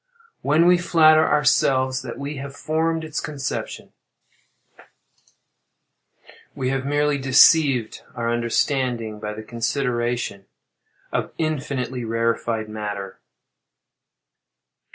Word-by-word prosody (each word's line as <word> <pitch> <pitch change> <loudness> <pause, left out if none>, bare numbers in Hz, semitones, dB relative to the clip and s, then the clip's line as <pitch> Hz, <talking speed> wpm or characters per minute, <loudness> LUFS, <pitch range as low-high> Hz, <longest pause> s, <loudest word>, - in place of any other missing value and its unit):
When 155 +4 +3
we 180 0 +5
flatter 155 -3 +5
ourselves 130 -1 +2
that 125 -3 -7
we 140 +1 -5
have 140 +1 -7
formed 160 +2 -1
its 155 -1 -4
conception, 145 -3 -5 2.6
we 130 -1 -2
have 135 0 -2
merely 145 0 +1
deceived 135 -2 +4
our 115 -1 -1
understanding 120 -2 -1
by 105 0 -5
the 110 - -8
consideration 120 -3 -2 0.6
of - - -2
infinitely 135 -5 -3
rarified 115 -1 -1
matter. 105 -2 -6
130 Hz, 90 wpm, -22 LUFS, 115-150 Hz, 2.6 s, we